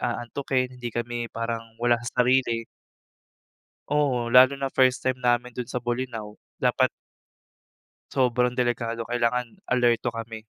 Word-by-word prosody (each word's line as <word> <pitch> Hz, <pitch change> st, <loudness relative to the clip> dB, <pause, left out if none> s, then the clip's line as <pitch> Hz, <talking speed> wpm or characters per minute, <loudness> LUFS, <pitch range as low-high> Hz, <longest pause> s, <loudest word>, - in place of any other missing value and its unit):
aantukin, 125 Hz, +1 st, -2 dB
hindi 120 Hz, -, -6 dB
kami 120 Hz, 0 st, -3 dB
parang 115 Hz, -1 st, -4 dB
wala 120 Hz, -1 st, +4 dB
sa 125 Hz, +1 st, +1 dB
sarili. 125 Hz, -2 st, +2 dB, 1.2 s
Oo, 135 Hz, -5 st, +1 dB
lalo 130 Hz, +3 st, +7 dB
na 135 Hz, -, -1 dB
first 130 Hz, 0 st, +3 dB
time 130 Hz, -1 st, 0 dB
namin 120 Hz, 0 st, +1 dB
dun 125 Hz, -, -2 dB
sa 125 Hz, -, -4 dB
Bolinao, 120 Hz, -3 st, -4 dB, 0.2 s
dapat -, -, +3 dB, 1.2 s
Sobrang 125 Hz, -2 st, +2 dB
delikado 115 Hz, -1 st, -1 dB
kailangan 120 Hz, 0 st, 0 dB, 0.2 s
alerto 120 Hz, -2 st, +2 dB
kami. 115 Hz, -1 st, -6 dB
120 Hz, 125 wpm, -25 LUFS, 115-125 Hz, 1.2 s, lalo